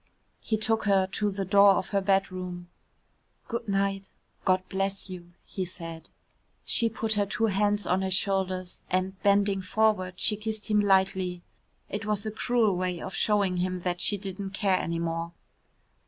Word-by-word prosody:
He 220 - -1
took 220 +1 +1
her 195 -2 +4
to 210 +2 0
the 195 0 -3
door 200 +1 +6
of 185 - -2
her 200 -1 +1
bedroom. 185 -2 -1 0.8
"Good 235 -1 -4
night 195 0 -1 0.4
God 185 -1 +2
bless 195 0 -2
you," 175 -1 -9
he 190 - -4
said. 165 -2 -7 0.6
She 230 - +2
put 225 0 -2
her 205 -1 +1
two 225 - 0
hands 205 0 +1
on 185 +1 +1
his 190 -1 +1
shoulders 190 -2 -1
and, 185 +1 -1
bending 200 -1 +3
forward, 185 -2 +1
she 210 - +2
kissed 215 0 -4
him 210 - +4
lightly. 190 -3 +2 0.4
It 210 +2 -5
was 210 0 -1
a 215 - -2
cruel 220 -2 +1
way 180 -1 -1
of 190 - -6
showing 200 -4 +1
him 180 0 -1
that 175 0 -2
she 205 - +3
didn't 195 0 -6
care 195 -2 +2
any 170 0 -2
more. 165 0 -3
195 Hz, 170 wpm, -28 LUFS, 185-205 Hz, 0.8 s, door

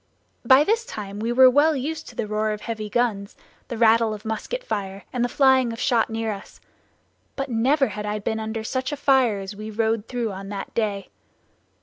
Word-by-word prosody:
By 265 +2 +6
this 450 +7 +1
time 205 - -7
we 230 +2 -1
were 260 +2 +7
well 290 +5 +4
used 310 +4 -4
to 240 - -11
the 225 - -2
roar 215 +1 -1
of 210 - -7
heavy 220 -2 -5
guns, 210 -3 -1 0.3
the 235 - -5
rattle 225 -1 +4
of 210 - -13
musket 220 - -4
fire, 195 - -4
and 245 -2 0
the 245 - 0
flying 260 -3 +4
of 230 - -7
shot 235 -3 +2
near 225 0 -2
us; 200 - -9 0.8
but 275 -1 -3
never 260 +3 +2
had 210 +1 -5
I 210 0 -1
been 220 +2 -2
under 220 0 -4
such 260 +5 -2
a 290 - -3
fire 265 -6 +3
as 195 +1 -7
we 215 +1 -7
rode 220 0 -1
through 240 -3 -2
on 195 +1 -8
that 200 -1 -6
day. 205 -3 -2
225 Hz, 210 wpm, -23 LUFS, 210-260 Hz, 0.8 s, were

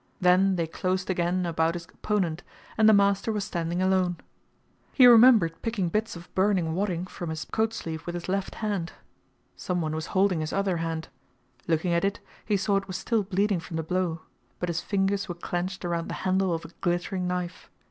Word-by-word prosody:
Then 185 +1 +4
they 170 -2 0
closed 185 +3 -2
again 180 0 0
about 165 0 +1
his 170 -1 -6
opponent, 175 -4 -2 0.3
and 220 -1 +5
the - - +8
master 200 +1 +3
was 210 -2 -1
standing 175 -1 -2
alone. 185 -2 +2 0.8
He 260 - +7
remembered 230 -8 +7
picking 215 -6 -1
bits 215 +4 -1
of 170 +1 -12
burning 185 -4 +2
wadding 180 -1 -1
from 175 -2 -7
his 160 -1 -4
coat 220 0 0
sleeve 160 -6 -6
with 175 - -3
his 175 - -5
left 195 +1 -2
hand. 195 -5 -2 0.6
Someone 170 -4 -2
was 160 0 -3
holding 190 -3 +3
his 155 0 -3
other 195 -3 0
hand. 165 -1 -3 0.6
Looking 170 +1 +1
at 170 - +1
it, 200 +1 0 0.3
he 210 -2 +2
saw 200 +1 +1
it 195 0 -3
was 185 -2 -4
still 230 +1 0
bleeding 200 0 0
from 165 0 -6
the 160 - -2
blow, 170 -1 -1 0.4
but 180 - -3
his 170 0 -1
fingers 200 +1 0
were 175 - -3
clenched 180 +2 -4
around 170 -1 -2
the - - -4
handle 190 0 +2
of 165 -1 -2
a - - -9
glittering 180 +1 -1
knife. 180 -1 -4
180 Hz, 195 wpm, -27 LUFS, 170-195 Hz, 0.8 s, the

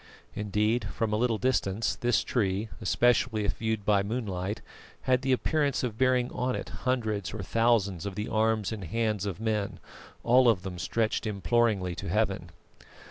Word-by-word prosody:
Indeed, 105 +2 0
from 110 +1 -2
a - - +3
little 115 0 +1
distance 115 -4 0
this 120 0 +1
tree, 105 -2 0
especially 120 -3 +2
if 100 - -1
viewed 110 -2 -2
by 105 -2 +4
moonlight, 100 -2 -3 0.4
had 130 -1 +2
the 135 0 0
appearance 140 +1 +1
of 120 -4 -2
bearing 130 -1 +2
on 125 +1 -1
it - - -5
hundreds 110 -6 -2
or 110 - -4
thousands 100 -4 +1
of 100 - -5
the 105 +2 -3
arms 110 -1 +1
and 105 -4 -5
hands 105 +1 -1
of 95 -1 -4
men, 110 -3 -1 0.4
all 125 +1 +5
of 95 -6 +2
them 90 -2 -6
stretched 110 +4 0
imploringly 100 -1 +1
to 85 - -6
Heaven. 95 -3 0
110 Hz, 165 wpm, -28 LUFS, 100-120 Hz, 0.4 s, all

